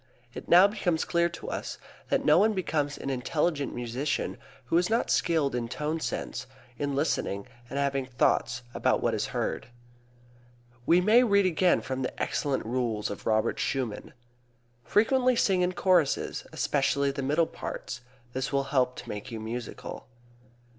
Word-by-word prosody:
It - - -9
now 180 +3 +8
becomes 180 -6 -1
clear 170 0 +2
to 175 - -7
us - - -4 0.3
that - - +1
no - - +6
one 220 +1 +4
becomes 150 -7 -1
an 135 - -4
intelligent 145 +3 -1
musician 120 +4 -2 0.3
who 165 - +2
is 180 - 0
not 230 +2 +1
skilled 160 -6 +2
in 120 -1 -2
tone 150 +6 -2
sense, 125 -4 -4 0.3
in 145 -1 -1
listening, 100 -8 -1 0.2
and 140 - -4
having 140 -2 0
thoughts 120 -1 +1
about - - +1
what - - +2
is - - -1
heard. - - -3 1.2
We 175 +2 +5
may 220 +6 +6
read 200 -4 +4
again 180 0 +3
from 130 0 -4
the 125 - -4
excellent 140 -6 -1
rules 115 -3 -1
of 100 - -7
Robert 110 -1 +1
Schumann: 125 -6 -2 0.7
"Frequently 250 - +3
sing 190 -5 +2
in 180 0 +1
choruses, 175 -5 +1
especially 140 0 +1
the 140 0 -4
middle 150 +5 +2
parts; 120 -5 -6 0.3
this 130 0 -2
will 140 -1 +1
help 125 -2 +2
to - - -9
make 105 +5 -6
you 115 -2 -5
musical." 115 +2 -6
140 Hz, 160 wpm, -28 LUFS, 125-175 Hz, 1.2 s, now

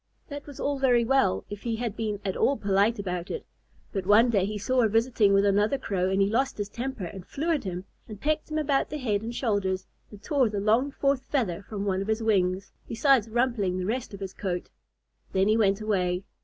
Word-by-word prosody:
That 285 0 -7
was 285 - -10
all 285 -1 -1
very 245 -3 +3
well, 230 - +2
if 205 0 -8
he 230 -2 -2
had 225 -2 -3
been 215 -3 -2
at 190 - -1
all 275 - +2
polite 200 +3 +2
about 180 -3 -4
it. - - -5 0.5
But 195 -3 -3
one 225 +4 +6
day 200 -4 +2
he 210 +1 -3
saw 255 +5 +1
her 225 - +4
visiting 225 -1 +3
with 200 0 +4
another 205 +6 +2
Crow, 185 -6 -1
and 190 +1 +1
he 195 - +4
lost 260 +6 0
his 205 -1 -3
temper, 240 -3 -4
and 185 +2 -8
flew 315 - -2
at 300 -8 0
him, 180 0 -4 0.2
and 215 -3 -9
pecked 310 +4 -1
him 310 - -2
about 285 -3 +1
the 300 - -4
head 215 -7 0
and 230 +2 -5
shoulders, 195 -6 0 0.2
and 210 - -12
tore 270 -4 +2
the 205 -1 -2
long 225 +7 +2
fourth 275 -1 0
feather 205 - -1
from 200 0 -5
one 190 -1 0
of 195 - -4
his 220 +1 0
wings, 190 -3 +1 0.2
besides 235 -1 +3
rumpling 225 -6 0
the 185 - -2
rest 240 +5 -2
of 200 -1 -9
his 190 -1 -5
coat. 180 -3 -4 0.6
Then 190 +1 +3
he 215 - +4
went 200 -2 +2
away. 185 -4 0
215 Hz, 230 wpm, -27 LUFS, 195-250 Hz, 0.6 s, one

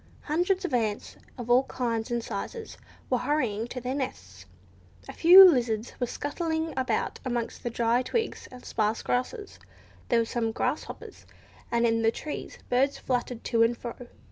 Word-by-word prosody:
Hundreds 360 +5 0
of 300 - -4
ants, 220 -4 -1 0.2
of 240 -2 -6
all 245 +1 +5
kinds 230 -4 -2
and 240 -1 -1
sizes, 235 - -6 0.3
were 250 - +1
hurrying 240 -6 -1
to 250 - -6
their 250 +1 -3
nests; 95 - -6 0.6
a - - -7
few 370 +3 +10
lizards 240 -7 +1
were 245 - 0
scuttling 320 +3 -3
about 260 0 -1
amongst 240 -3 -3
the 240 - -3
dry 235 +1 +1
twigs 445 - -3
and 250 -1 -12
sparse 215 0 -1
grasses; 395 - -3 0.5
there 235 - +3
were 230 - +2
some 225 -1 -1
grasshoppers, - - -4 0.4
and 235 0 +2
in 225 -1 +2
the 225 - +4
trees 295 +6 -6
birds 270 +3 +1
fluttered 245 -2 -3
to 230 -2 +1
and 230 +1 +3
fro. 235 -1 -6
245 Hz, 165 wpm, -27 LUFS, 230-285 Hz, 0.6 s, few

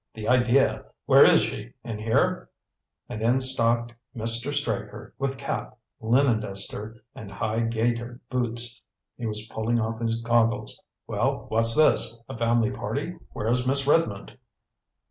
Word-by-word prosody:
The 110 -1 -6
idea! 125 +1 +3 0.2
Where - - +7
is - - +6
she? 110 +3 -5
In 110 -2 -6
here?" 135 +12 0 0.6
And 110 - -6
in 120 +4 +2
stalked 120 -2 0 0.2
Mr. 115 +4 0
Straker, 125 -8 -3
with 135 -1 -2
cap, 140 -2 -5 0.2
linen 120 +1 +2
duster, 105 +2 -3
and 105 - -10
high 110 +2 -2
gaitered 115 +1 -1
boots. 120 -1 -1 0.3
He 120 - -5
was 105 0 -3
pulling 115 +2 0
off 115 +1 -3
his 115 0 0
goggles. 115 -2 0 0.2
"Well, - - -1
what's 115 +1 +2
this? 115 -6 +4
A - - -7
family 115 -1 +1
party? 145 +11 -4
Where's 125 +4 -1
Miss 135 +1 +4
Redmond?" 140 -10 0
115 Hz, 140 wpm, -25 LUFS, 110-125 Hz, 0.6 s, Where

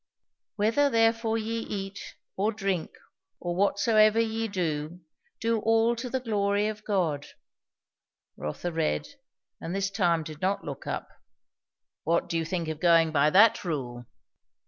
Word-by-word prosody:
"'Whether 225 +7 +2
therefore 225 -1 +2
ye 225 +1 -2
eat, 195 -3 -6 0.2
or 205 +3 +1
drink, 195 -6 -2 0.5
or 175 -1 -3
whatsoever 215 +3 +3
ye 225 0 0
do, 170 -3 -3 0.4
do 230 0 +1
all 225 +2 +3
to 245 +2 -5
the 260 - -1
glory 205 -3 0
of 215 0 -4
God.'" 170 -9 -1 1.1
Rotha 125 - -4
read, 160 - -1 0.5
and 170 - -4
this 195 0 -1
time 175 -5 +1
did 155 -1 -9
not 190 +2 0
look 140 -2 -7
up. - - -3 1.0
"What 170 +1 +1
do - - -4
you 165 -1 0
think 170 0 -3
of 160 -1 -4
going 165 -2 +4
by 150 0 +3
that 205 +7 +5
rule?" 125 -8 -4
195 Hz, 145 wpm, -27 LUFS, 165-225 Hz, 1.1 s, that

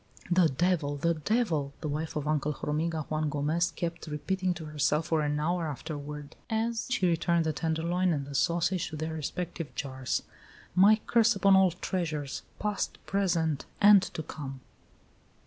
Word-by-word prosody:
"The 175 -2 +5
devil! 155 0 +1
the 170 +4 +2
devil!" 160 - 0
the - - -3
wife 155 +2 -3
of 150 -1 -2
Uncle 150 0 +1
Hormiga 155 +2 -2
Juan 155 0 0
Gomez 150 +4 +1
kept 170 -1 -5
repeating 185 +5 -1
to 160 -1 -7
herself 150 +1 +1
for 160 -2 +1
an 150 0 0
hour 170 +2 0
afterward, 150 0 -6
as 225 +1 -1
she 250 -7 +1
returned 170 -1 +2
the 160 - 0
tenderloin 170 +4 0
and 145 -4 -1
the 140 - -8
sausage 170 +4 +1
to - - -7
their 160 +1 -3
respective 165 +1 -4
jars. 130 -2 -2 0.5
"My 205 +4 +6
curse 230 -2 +4
upon 195 0 +5
all 190 -1 +6
treasures 165 -5 -3 0.2
past, 210 -1 -2
present, 170 -7 0
and 205 -1 +8
to 160 -4 -5
come!" 135 -4 -7
160 Hz, 160 wpm, -29 LUFS, 150-180 Hz, 0.5 s, and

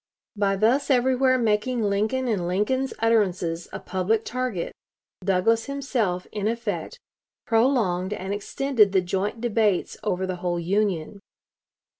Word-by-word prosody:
By 200 -1 +1
thus 230 +9 +2
everywhere 260 0 +3
making 230 +1 +1
Lincoln 215 +6 0
and 195 -7 0
Lincoln's 245 +9 0
utterances 185 -7 +1
a - - -5
public 195 +4 -1
target, 250 -8 -3 0.5
Douglas 195 +4 +2
himself, 250 -10 -1
in 210 -1 -2
effect, 235 +1 -3 0.5
prolonged 225 -6 +2
and 195 -1 -3
extended 210 0 +1
the 190 - +4
joint 195 +5 -2
debates 220 -5 +1
over 190 -2 -1
the 185 -1 -3
whole 175 -1 -2
Union. 195 0 -1
210 Hz, 125 wpm, -25 LUFS, 185-240 Hz, 0.5 s, the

